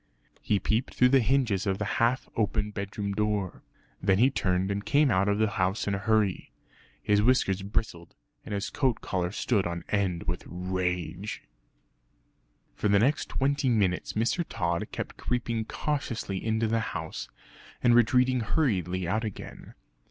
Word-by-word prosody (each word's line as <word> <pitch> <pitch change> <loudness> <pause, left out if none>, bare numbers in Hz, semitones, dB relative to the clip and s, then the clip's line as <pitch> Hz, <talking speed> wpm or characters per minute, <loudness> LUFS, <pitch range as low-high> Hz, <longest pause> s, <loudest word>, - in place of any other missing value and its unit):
He 105 - +1
peeped 110 +5 -1
through 125 - +5
the 135 +1 +5
hinges 115 -6 +1
of 95 -1 +1
the 105 - -2 0.2
half 120 +3 +2
open 105 -1 0
bedroom 100 0 -4
door. 105 -3 -1 0.4
Then 95 0 +3
he 130 +6 +4
turned 95 -5 0
and 100 0 -2
came 145 +1 +3
out 95 0 +2
of 100 - +2
the 110 0 +3
house 95 +4 0
in 100 - +1
a 100 - -1
hurry. 105 -2 +1 0.5
His 105 0 +3
whiskers 105 -5 +2
bristled 95 -4 -4 0.3
and - - -9
his 100 - -3
coat 130 -5 0
collar 90 -1 -2
stood 105 -2 0
on 85 -1 -4
end 95 -5 0
with 85 +1 -3
rage. 90 +2 -3 1.3
For - - -1
the 100 0 +4
next 135 +9 +2
twenty 140 0 +1
minutes 100 -6 +1
Mr. 115 +11 +1
Tod 85 -4 -1
kept - - -5
creeping 115 -2 -2
cautiously 120 -9 -3
into 110 0 +1
the 115 +1 +1
house, 80 -7 -5 0.5
and 120 - +5
retreating 125 +2 +4
hurriedly 95 - 0
out 110 +5 0
again. 110 -3 -8
105 Hz, 160 wpm, -28 LUFS, 95-120 Hz, 1.3 s, through